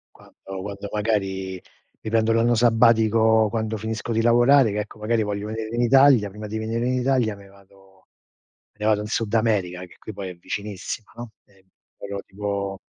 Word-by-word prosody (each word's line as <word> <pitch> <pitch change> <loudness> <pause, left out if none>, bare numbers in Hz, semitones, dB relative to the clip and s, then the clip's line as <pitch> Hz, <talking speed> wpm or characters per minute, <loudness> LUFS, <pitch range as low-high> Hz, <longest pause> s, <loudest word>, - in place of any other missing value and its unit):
Quando - - -20 0.3
quando 100 0 -6
magari 95 -3 -2 0.4
mi 110 - -6
prendo 115 0 +2
l'anno 115 +1 +3
sabbatico, 110 -1 +4
quando 110 0 -2
finisco 110 +2 -4
di 115 0 +1
lavorare, 120 +2 +5
che 105 - -1
ecco, 105 +1 -8
magari 110 +1 0
voglio 105 0 -3
venire 110 +1 -5
in 120 - +1
Italia, 130 -3 +5
prima 105 +2 -8
di 110 +1 -4
venire 115 +2 -2
in 130 - 0
Italia 125 -4 +1
me 100 0 -15
vado 95 -1 -22 0.7
me - - -42
ne 105 - -1
vado 105 -1 +3
in - - -6
Sud 110 -1 -2
America, 105 -6 +1
che 90 - -19
qui 110 - -9
poi 95 -1 -6
è - - -9
vicinissima, 105 +3 -6
no? 120 -1 -8
Ehm, 95 -1 -27 0.3
però 100 0 -6
tipo 100 -1 -4
110 Hz, 185 wpm, -23 LUFS, 100-115 Hz, 0.7 s, lavorare